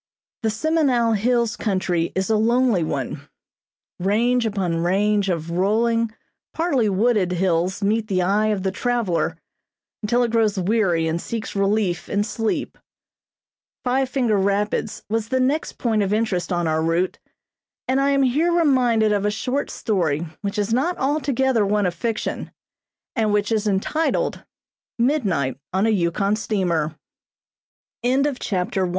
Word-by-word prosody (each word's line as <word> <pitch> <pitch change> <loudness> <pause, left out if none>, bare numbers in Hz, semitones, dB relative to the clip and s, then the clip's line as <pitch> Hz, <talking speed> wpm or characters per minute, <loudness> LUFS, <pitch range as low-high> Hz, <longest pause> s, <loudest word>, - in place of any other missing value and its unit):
The 225 - +1
Semenow 245 -2 +2
Hills 235 +1 +1
country 185 -5 -1
is 190 +3 0
a - - +4
lonely 230 -3 +2
one. 140 -1 -4 0.7
Range 230 +6 +2
upon 190 -5 -1
range 200 +3 +1
of 170 -2 -2
rolling, 225 +5 +1 0.4
partly 280 -10 +1
wooded, 200 -2 +2
hills 180 +2 0
meet 215 +2 +1
the 185 -3 +1
eye 205 +4 +2
of 205 -3 -1
the 190 - 0
traveler 230 -5 -1 0.6
until 235 +3 +2
it 235 - -1
grows 220 -3 +2
weary 185 -4 +1
and 165 +1 -1
seeks 225 -2 -5
relief 195 -3 0
in 205 0 +1
sleep. 225 +1 -3 1.0
Five 260 +1 +1
Finger 245 -6 +1
Rapids 200 +2 -1
was 225 +1 -1
the 260 0 +1
next 275 +5 0
point 225 -3 0
of 195 -1 0
interest 210 -4 0
on 175 -1 0
our 160 0 +1
route, 165 +3 0 0.7
and 265 +1 +2
I 275 - +2
am 275 -1 +3
here 295 +7 +2
reminded 250 -10 +3
of 205 -1 +1
a 210 - +2
short 255 +6 -2
story 170 -8 -1 0.2
which 200 +1 -3
is 210 +2 0
not 290 +9 +1
altogether 265 -4 +1
one 205 0 +1
of 180 - 0
fiction, 220 +6 -3 0.7
and 220 -4 +1
which 205 +1 +1
is 215 -1 +1
entitled: 210 +11 0 0.5
Midnight 205 - 0
on 190 +3 +1
a 225 - +3
Yukon 195 +2 +1
St 180 -8 -1
210 Hz, 140 wpm, -22 LUFS, 190-240 Hz, 1.0 s, a